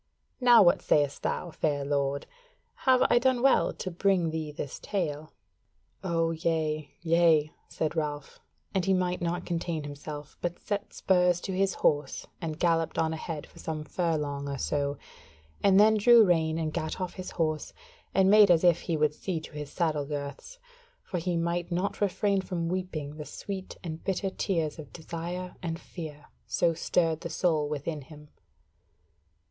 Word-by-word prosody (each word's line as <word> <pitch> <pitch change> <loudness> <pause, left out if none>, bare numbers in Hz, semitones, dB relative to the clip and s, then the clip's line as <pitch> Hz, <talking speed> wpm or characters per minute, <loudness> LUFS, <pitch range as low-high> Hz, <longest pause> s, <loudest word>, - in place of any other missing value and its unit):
Now 245 -4 +7
what 175 - +4
sayest 145 -2 +2
thou, 175 - -2
fair 145 -3 -1
lord? 140 0 0 0.6
Have 255 -1 +6
I 240 - +6
done 255 -1 +2
well 270 - +4
to 185 - -5
bring 180 -2 +2
thee 155 -1 -3
this 145 -2 -6
tale?" 155 -6 -3 0.7
"O 165 -2 +1
yea, 160 -2 -1
yea," 165 -3 +3
said 155 0 -2
Ralph, 150 -3 -3 0.3
and 190 - +1
he 190 +1 +3
might 180 -1 0
not 175 +1 -2
contain 165 -2 -2
himself; 145 +1 -8
but 175 0 -2
set 205 -1 -4
spurs 180 -2 +2
to 195 - -4
his 195 0 +1
horse 145 -2 0 0.2
and 155 -2 -3
galloped 165 -1 +1
on 160 0 +1
ahead 160 -2 -5
for - - -17
some 155 -1 -4
furlong 150 -4 -2
or 140 - -3
so: 140 +1 -1 0.6
and 195 0 +5
then 215 +1 +6
drew 230 +1 +7
rein 160 -3 +2
and 155 -2 -2
gat 160 +1 -3
off 185 -1 -3
his 185 -1 -6
horse, 155 -2 -1 0.4
and 190 0 +4
made 210 0 +7
as 170 -1 +5
if 175 -2 +4
he 165 -3 -1
would 150 -1 +2
see 170 +2 -3
to 155 - -11
his 150 -1 -7
saddle 155 -4 0
girths, 145 - -6 0.5
for 180 - -3
he 175 0 -1
might 170 +1 -1
not 180 +5 -1
refrain 200 0 +1
from 170 -3 -3
weeping 160 -5 -4
the 150 - -6
sweet 190 +2 -7
and 160 -2 -6
bitter 195 0 -1
tears 165 -6 -1
of 145 -3 -9
desire 175 +2 -6
and 165 -1 -3
fear, 155 -4 -9 0.2
so 170 -1 +2
stirred 165 -1 +1
the 170 - -5
soul 155 -5 +1
within 150 +1 -3
him. 150 +1 -14
165 Hz, 170 wpm, -28 LUFS, 150-180 Hz, 0.7 s, Now